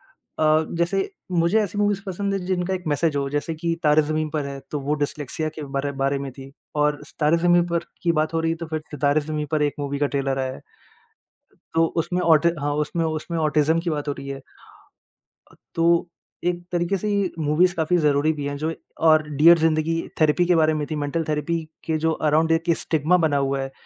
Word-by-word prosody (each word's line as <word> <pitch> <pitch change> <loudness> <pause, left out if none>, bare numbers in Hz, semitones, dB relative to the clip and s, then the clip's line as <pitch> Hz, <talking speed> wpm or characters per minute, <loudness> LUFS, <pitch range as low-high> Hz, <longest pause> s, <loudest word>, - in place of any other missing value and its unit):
अ, 155 0 +1
जैसे 185 - 0 0.2
मुझे 170 +5 +3
ऐसी 205 0 -4
मूवीज़ 205 -1 +1
पसंद 200 +1 -2
है 195 - 0
जिनका 185 0 -1
एक 185 -1 -4
मैसेज 150 +1 +1
हो 140 -1 -1
जैसे 150 +3 -2
कि 165 +1 -1
तारे 150 +1 +5
ज़मीन 155 0 -1
पर 150 -2 -2
है 140 -1 -6
तो 150 - -2
वो 145 +2 -1
डिस्लेक्सिया 150 +2 -3
के 155 - -6
बारे 140 +1 -1
बारे 140 0 +1
में 135 -1 -5
थी 135 +1 -11 0.3
और 150 -1 +1 0.2
तारे 155 +2 +3
ज़मीन 175 0 +4
पर 170 0 -1 0.2
की 170 - +3
बात 155 0 0
हो 165 - +1
रही 165 - +1
है, 165 - -3
तो 165 - -5
फिर 155 -1 -2
सितारे 145 +1 +1
ज़मीन 150 0 -3
पर 155 -1 +1
एक 145 -1 +1
मूवी 140 0 -2
का 145 - +2
ट्रेलर 135 -1 -1
आया 130 0 -2
है। - - -11 1.1
तो 165 0 +4
उसमें 180 +2 0
ऑटि 165 0 +5
हाँ 145 0 0
उसमें 165 +1 -2
उसमें 160 +1 -3
ऑटिज्म 155 +1 +2
की 170 - -2
बात 150 -2 -3
हो 145 - 0
रही 140 - -8
है। 135 0 -6 1.1
अ, - - -20 0.2
तो 170 +1 +3 0.4
एक 175 0 -1
तरीके 175 +3 0
से 210 +3 -3
ये 200 -3 +1
मूवीज़ 160 +4 +3
काफ़ी 165 +2 +1
ज़रूरी 150 0 +2
भी 145 -2 -5
हैं। 145 0 -3
जो 160 +2 -2 0.3
और 155 -1 +6
डियर 160 +4 +6
ज़िंदगी 160 0 +1 0.3
थेरेपी 155 +3 +4
के 175 -1 +3
बारे 155 -1 +3
में 150 -1 -2
थी, 155 - -3
मेंटल 150 +3 -1
थेरेपी 150 +3 0 0.3
के 160 -2 0
जो 160 +1 +1 0.2
अराउंड 160 +2 +3 0.2
स्टिग्मा 160 +3 +2
बना 145 -2 +1
हुआ 135 0 0
है 135 0 -5
155 Hz, 215 wpm, -23 LUFS, 145-170 Hz, 1.1 s, और